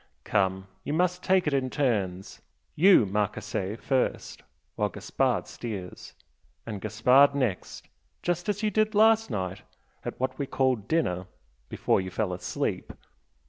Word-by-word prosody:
Come 95 -1 0 0.2
you 145 - -3
must 180 +2 +1
take 185 -1 +2
it 150 - 0
in 130 -2 +1
turns 100 -10 -2 0.3
you, 180 - +6
Marchese, 105 0 -2
first, 130 +3 -1 0.3
while - - 0
Gaspard - - -1
steers 100 -6 -7 0.5
and 105 -4 -6
Gaspard 125 +7 +4
next 125 -10 -2 0.4
just 175 +2 -1
as 205 +1 -1
you 210 - +1
did 215 +1 +1
last 225 +1 +5
night 95 -2 -3 0.4
at - - -6
what 130 +2 -2
we 140 - -2
called 130 -7 0
dinner, 90 - 0 0.4
before - - +1
you 95 - -5
fell 95 0 -2
asleep! 90 0 -3
125 Hz, 140 wpm, -27 LUFS, 100-160 Hz, 0.5 s, you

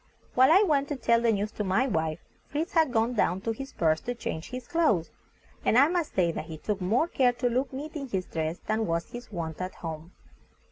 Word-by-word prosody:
While 260 +3 +6
I 380 +5 +7
went 285 -7 +2
to 290 - -2
tell 235 -3 +2
the 235 -1 +3
news 210 0 -1
to 210 - -3
my 195 +6 +2
wife, 160 - -1 0.3
Fritz 315 +5 -2
had 320 -5 +3
gone 230 +2 +1
down 190 -5 +1
to 225 - -1
his 270 +5 -6
berth 160 -1 +1
to 245 - -2
change 160 -7 -5
his 255 -1 -7
clothes, 310 - +2 0.5
and 230 - +3
I 280 +4 +7
must 345 -3 -1
say 175 -3 +3
that 160 - -5
he 160 -1 -7
took 200 +5 -3
more 225 - +2
care 255 -7 +2
to 245 +1 -1
look 255 +3 0
neat 295 +4 -6
in 280 -3 -4
his 190 -6 -2
dress 160 +1 -3
than 220 0 0
was 165 0 -2
his 240 -1 -9
wont 165 -3 -4
at 185 +1 -4
home. 160 +1 -7
230 Hz, 235 wpm, -28 LUFS, 175-270 Hz, 0.5 s, I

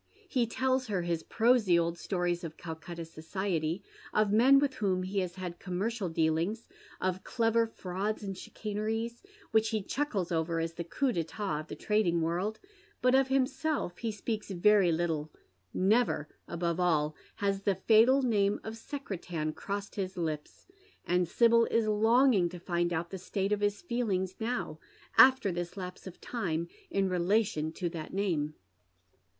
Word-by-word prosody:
He 250 -9 +1
tells 260 +2 0
her 195 -5 -1
his 170 -2 -1
prosy 225 -5 +3
old 170 0 +1
stories 175 -2 -1
of 160 -2 -7
Calcutta 165 +1 -7
society, 165 +1 -2 0.3
of 215 -1 +2
men 255 +5 +7
with 275 -1 +2
whom 195 -6 0
he 195 +2 -1
has 180 -2 -3
had 180 -2 -6
commercial 200 +2 -2
dealings, 165 +7 0 0.3
of 185 0 -1
clever 230 -1 +2
fraudg 205 +1 -3
and 195 -1 -4
chicaneries 225 +4 -4 0.3
which 220 -1 +3
he 215 -3 -1
chuckles 200 - -2
over 165 0 0
as 165 0 -2
tlie 170 0 -6
coups 270 -3 +1
d'etat 165 0 -2
of 155 - -8
the - - -6
trading 210 -6 +1
world, 175 +6 -1 0.4
bat 250 0 +4
of 265 0 +5
himself 265 - 0
he 230 - -2
speaks 215 +1 -4
vcrj^ 195 -1 +4
little. 160 -2 -1 0.4
Never, 200 -5 +2 0.2
above 170 0 -2
all, 155 -4 +2 0.2
has 200 -1 -1
the 200 -1 +1
fatal 230 +7 +5
name 205 -4 +2
of 220 +1 -6
Secretan 180 - -4
crossed 200 +3 -5
Ids 190 -1 -3
lips; 155 -3 -4 0.4
and 180 0 +2
Sibyl 230 +4 +5
in 230 -1 +1
longing 220 -2 +4
to 180 - -8
find 175 0 0
out 170 0 -2
the 190 - -5
state 195 +2 -2
of 210 0 +1
his 205 - 0
feelings 205 - -1
now, 225 -9 -3 0.4
after 260 -6 +7
this 175 +2 -4
lapse 180 0 -7
of 185 - -10
time, 170 -8 -2 0.2
in 195 -1 +1
relation 180 -3 +1
to 180 - -2
that 165 -2 -7
name. 160 -7 0
195 Hz, 160 wpm, -31 LUFS, 170-225 Hz, 0.4 s, men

